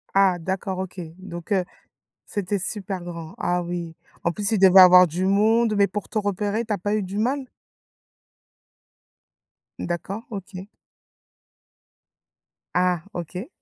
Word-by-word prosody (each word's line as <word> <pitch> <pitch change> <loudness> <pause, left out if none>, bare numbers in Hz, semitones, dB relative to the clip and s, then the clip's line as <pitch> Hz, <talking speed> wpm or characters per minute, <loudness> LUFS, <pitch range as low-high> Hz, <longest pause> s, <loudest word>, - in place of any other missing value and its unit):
Ah, 195 -2 +4
d'accord, 190 +2 -3
OK, 185 0 -5 0.2
donc 175 -1 -9
heu, 190 -2 +3 0.6
c'était 205 -1 -2
super 195 -1 -4
grand. 170 -2 -8
Ah, 180 0 0
oui! 170 -1 -5 0.3
En 170 - +1
plus, 205 +2 -1
il 220 - +2
devait 190 0 +8
avoir 180 0 +9
du 175 +4 -2
monde, 215 +3 +3
mais 200 0 +5
pour 205 +1 -5
te 220 - -2
repérer, 205 +2 -1
tu 220 - -3
as 205 - -1
pas 205 +4 -1
eu 210 - -1
du 195 +2 -5
mal? 260 +4 0 2.3
D'accord. 190 +5 -4
OK. 190 -2 -7 2.1
Ah, 180 -2 +1
OK. 180 - -6
190 Hz, 135 wpm, -24 LUFS, 180-205 Hz, 2.3 s, avoir